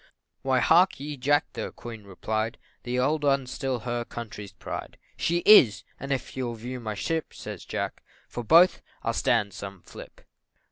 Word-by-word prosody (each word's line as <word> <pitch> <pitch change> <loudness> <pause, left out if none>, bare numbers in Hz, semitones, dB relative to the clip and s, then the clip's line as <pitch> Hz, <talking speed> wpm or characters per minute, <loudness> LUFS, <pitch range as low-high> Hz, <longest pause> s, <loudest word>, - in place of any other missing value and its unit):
"Why, 130 -2 +2
hark 175 +4 +5
ye, 145 +1 -5
Jack," 145 +2 +1
the - - -4
Queen 115 -3 -9
replied, 110 +3 -2 0.2
"The 125 +1 -3
old 150 +4 +1
'un's 135 -3 +2
still 130 -4 -2
her 120 +1 -2
country's 105 -4 -8
pride." - - -7 0.2
"She 170 +1 0
is 135 - +8 0.2
and 135 +1 -5
if 135 - -2
you'll 125 -3 -2
view 125 +3 -6
my 110 -3 -4
ship," 160 +9 -2
Says - - -7
Jack, - - -3 0.3
"for 120 - -5
both 170 +9 +6 0.2
I'll - - 0
stand 105 -4 +1
some 100 -2 -8
flip." - - -12
125 Hz, 170 wpm, -27 LUFS, 110-145 Hz, 0.3 s, is